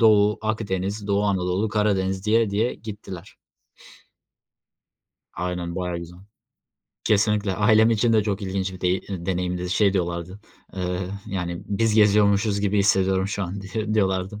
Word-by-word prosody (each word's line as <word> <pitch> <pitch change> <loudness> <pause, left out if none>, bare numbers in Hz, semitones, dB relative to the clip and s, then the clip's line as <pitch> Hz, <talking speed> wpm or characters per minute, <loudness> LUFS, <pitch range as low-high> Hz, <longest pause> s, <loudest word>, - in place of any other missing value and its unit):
Doğu, 105 -2 +5
Akdeniz, 100 -2 -2
Doğu 100 0 +1
Anadolu, 95 +1 0
Karadeniz 100 -2 0
diye 110 0 +3
diye 110 +5 0
gittiler. 100 -4 -9 2.0
Aynen 90 -1 -4
bayağı 90 -2 -2
güzel. 85 +1 -9 0.9
Kesinlikle 105 -2 +2
ailem 110 +3 +4
için 115 +1 +2
de 110 - +4
çok 100 -1 -2
ilginç 95 0 -2
bir 95 - -10
dey 90 +1 +1
ııı, 90 -3 -5
deneyimdi. 90 -1 -2
Şey 100 +1 +3
diyorlardı, 85 +1 -3 0.4
eee, 90 0 -3 0.2
yani, 85 -2 -4
"Biz 110 +2 +1
geziyormuşuz 100 -1 +4
gibi 100 0 +1
hissediyorum 95 -1 +2
şu 100 0 -3
an." 95 +2 -5
diye 105 +3 -3
diyorlardı. 95 0 0
100 Hz, 140 wpm, -24 LUFS, 90-105 Hz, 2.0 s, Doğu